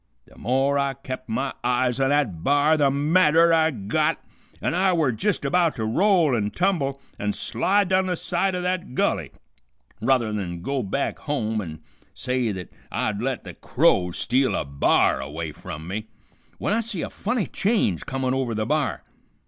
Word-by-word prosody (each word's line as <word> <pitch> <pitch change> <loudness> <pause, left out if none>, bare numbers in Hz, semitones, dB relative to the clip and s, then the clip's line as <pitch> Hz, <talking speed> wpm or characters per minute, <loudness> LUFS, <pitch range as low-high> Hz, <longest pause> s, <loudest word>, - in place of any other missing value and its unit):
The - - -20
more 135 +3 +1
I 140 -1 0
kept 130 -1 -7
my 130 +4 -1
eyes 125 +1 +1
on 135 0 +2
that 125 - 0
b'ar 145 +2 +4
the 145 -3 +3
madder 160 +3 +4
I 160 -1 +4
got, 105 -8 0 0.4
an' - - -1
I 185 +1 +3
were 160 -6 +2
jist 185 - -1
about 170 +3 +2
to 110 - -2
roll 170 - +3
and 105 -2 -1
tumble 160 -8 0 0.2
an' 105 0 -1
slide 190 - +1
down 190 0 +2
the 180 - 0
side 185 +3 -1
o' 180 - -3
that 180 -7 -2
gulley - - 0 0.7
ruther 120 -2 +2
than 85 -4 -4
go 140 +2 -1
back 125 +7 -2
home 110 -7 -2
an' 80 -4 -8 0.3
say 125 -3 -1
th't 90 -3 -7 0.2
I'd 105 -1 -1
let 130 0 -2
the - - -8
crows 90 -1 +1
steal 130 +2 +1
a - - -1
b'ar 70 -1 +2
away 75 +4 -5
from 80 +2 -8
me, 105 +4 -4 0.5
w'en - - -2
I - - +2
see 225 -6 -3
a - - -4
funny 245 -5 -1
change 195 - 0
comin' 130 -1 -1
over 130 -4 -1
the 110 0 -1
b'ar. 140 - -1
135 Hz, 180 wpm, -24 LUFS, 110-165 Hz, 0.7 s, b'ar